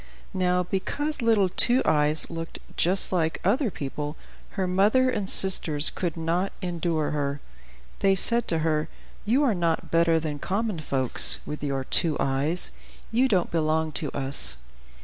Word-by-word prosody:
Now 180 -1 0
because 285 - -3
little 225 -4 +2
Two 245 +7 +3
Eyes 150 +1 +1
looked 165 0 -7 0.2
just 185 +3 0
like 165 -3 -1
other 240 +6 +1
people, 150 -1 -6 0.4
her 190 - 0
mother 210 +8 +2
and 200 -5 -2
sisters 160 -6 +4
could 170 -3 -4
not 170 +4 -2
endure 170 -4 -2
her. 145 -1 -3 0.6
They 195 0 +2
said 235 +5 +4
to 165 - 0
her, 155 -1 -1 0.4
"You 250 +7 +2
are 255 -6 +2
not 170 -3 -2
better 165 0 +2
than 150 -2 -5
common 200 +2 -3
folks, 135 -4 +4
with 150 0 -7
your 135 -2 -2
two 155 +3 +1
eyes; 140 +6 0 0.4
you 245 +4 +2
don't 190 -8 0
belong 160 -1 -1
to 150 0 +5
us." 135 - -1
170 Hz, 150 wpm, -25 LUFS, 155-195 Hz, 0.6 s, to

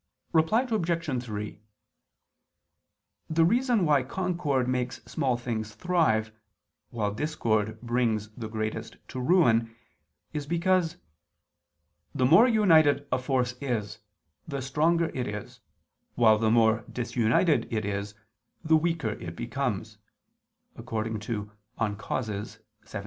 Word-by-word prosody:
Reply 165 +9 +3
Obj. 170 - -1
3: 105 -2 -6 1.7
The 165 +1 +3
reason 235 0 +2
why 145 -3 +4
concord 150 -3 -1
makes 125 -1 -1
small 130 -6 -1
things 110 -3 -4
thrive, 155 -12 +1 0.6
while 105 -3 -2
discord 110 -6 -1
brings 115 -3 0
the 110 +1 -7
greatest 110 0 -4
to 130 - -5
ruin, 120 -7 +3 0.6
is 145 -2 -4
because 170 +1 +1 1.2
"the 130 - +2
more 170 - +7
united 160 - +4
a 125 - +2
force 125 -1 0
is, 110 -6 -3 0.5
the 140 -4 -4
stronger 160 +5 +1
it 125 - -2
is, 105 0 -7 0.6
while 110 -3 +5
the 110 0 +2
more 110 0 +4
disunited 120 +6 +1
it 110 -2 -1
is 100 0 -3 0.5
the 160 0 +5
weaker 165 -6 0
it 85 -5 -7
becomes" - - -3 0.8
(De - - -7
Causis 110 0 -4 0.3
xvii). 110 -1 -5
125 Hz, 110 wpm, -27 LUFS, 110-160 Hz, 1.7 s, more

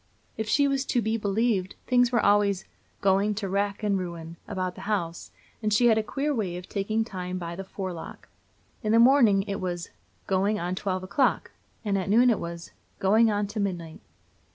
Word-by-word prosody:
If 220 0 -4
she 285 +4 +4
was 275 -1 0
to 245 - +1
be 220 -1 0
believed, 205 -2 0
things 245 -1 +3
were 235 - +2
always 200 -2 +3 0.4
"going 200 +2 +2
to 200 -1 -3
wrack 200 +2 -1
and 200 -2 +1
ruin" 170 -2 -6
about 185 -1 -3
the 200 - -8
house; 170 -5 -2 0.3
and 215 -1 0
she 240 +3 +5
had 220 - +4
a - - +2
queer 280 +7 -2
way 195 -8 -2
of 180 +1 -9
taking 215 +2 -1
time 185 -3 -5
by 170 -1 -5
the 195 - -6
forelock. 185 -3 -7 0.5
In 215 0 0
the - - +6
morning 235 -6 +6
it 200 0 -4
was 175 -2 -4 0.3
"going 200 +2 +1
on 175 +1 -2
to 185 - -5
twelve 185 -2 -2
o'clock," 255 +8 +1 0.3
and 200 -2 +1
at 190 - -4
noon 240 +4 +5
it 220 - 0
was 170 0 -7 0.3
"going 220 +4 +4
on 205 -1 0
to 215 - -3
midnight." 175 -5 -3
200 Hz, 200 wpm, -27 LUFS, 185-220 Hz, 0.5 s, the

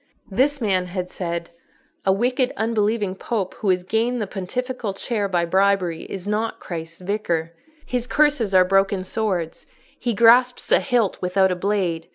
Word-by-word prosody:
This 275 +8 +2
man 190 -6 0
had 180 0 -4
said, 170 -1 -4 0.6
"A - - +6
wicked, 250 +6 +1
unbelieving 215 -2 0
Pope 195 -1 -3
who 210 - 0
has 180 -1 +2
gained 230 +6 0
the 215 - -1
pontifical 220 +3 -4
chair 205 0 -2
by 175 -2 +1
bribery 190 -2 +1
is 190 -2 -7
not 215 +2 -1
Christ's 165 0 -7
Vicar. 175 -4 -2 0.3
His 250 -1 -2
curses 290 -9 +2
are 185 0 +7
broken 195 0 +2
swords: 185 -6 -2 0.3
he 240 -3 -1
grasps 245 +3 +4
a - - +6
hilt 240 -7 0
without 190 +1 +2
a - - 0
blade. 180 -4 -1
200 Hz, 160 wpm, -22 LUFS, 180-230 Hz, 0.6 s, are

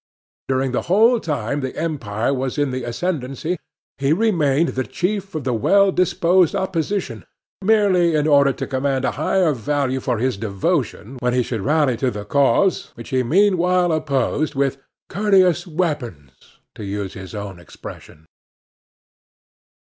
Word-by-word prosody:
During 130 0 0
the 125 - 0
whole 225 +6 +5
time 145 - -2
the 130 -2 -5
Empire 125 -7 -2
was 130 +1 -3
in 145 -2 +1
the 130 0 -4
ascendancy 155 +4 -3 0.4
he 140 +2 +2
remained 165 -7 +2
the 130 - -2
chief 195 +5 -3
of 155 - -3
the 130 -1 -1
well 195 - +3
disposed 180 -1 +2
Opposition, 175 - -2 0.4
merely 190 -5 +3
in 150 0 +1
order 140 -2 +5
to - - -5
command 130 0 -1
a - - +1
higher 170 +3 +1
value 130 +1 -1
for 125 -2 -1
his 125 0 -1
devotion 115 - -2
when 125 0 0
he 125 - +2
should 115 -3 -4
rally 145 -1 +2
to 130 +2 0
the 105 -3 -6
cause 140 - +2
which 115 - -10
he 130 -1 +1
meanwhile 180 - +2
opposed 150 -1 -1
with 135 0 0 0.3
"courteous 185 -3 +2
weapons," 145 - -3 0.4
to - - -9
use 100 -1 -4
his 95 +2 -9
own 100 -3 -6
expression. 80 -2 -12
140 Hz, 150 wpm, -21 LUFS, 125-175 Hz, 0.4 s, whole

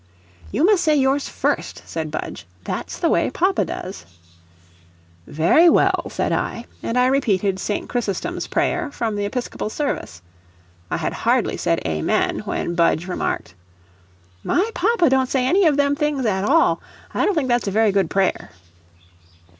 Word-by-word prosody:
"You 320 - +2
must 400 -2 +4
say 310 -2 +3
yours 275 0 +1
first," - - -2
said 160 -2 -4
Budge; 150 - -6 0.2
"that's - - -5
the - - +1
way - - +2
papa - - +1
does." 90 -1 -7 1.2
"Very 175 - +4
well," - - +2
said - - -2
I, 235 - -2 0.2
and 230 - -2
I 250 - +4
repeated 205 -8 +1
St. 205 - -3
Chrysostom's 245 - -3
prayer, 350 -3 0
from 225 -5 -2
the 205 0 -1
Episcopal 240 0 -4
service. 215 - -4 0.7
I - - -1
had - - -2
hardly - - +1
said - - -1
"Amen," 80 -1 0
when 170 - -2
Budge 170 0 +2
remarked: 90 - -3 0.9
"My 410 +6 +1
papa 405 -2 +2
don't 260 -1 +2
say 260 -2 +1
any 365 +6 +4
of 295 -3 +2
them 285 0 +2
things 290 -3 -1
at 195 -2 0
all; 325 +7 +3 0.3
I - - +1
don't 410 - +2
think 295 -5 0
that's 240 -3 +1
a - - +2
very 215 +1 +3
good 195 -4 +1
prayer." 195 +1 0
250 Hz, 160 wpm, -21 LUFS, 195-300 Hz, 1.2 s, must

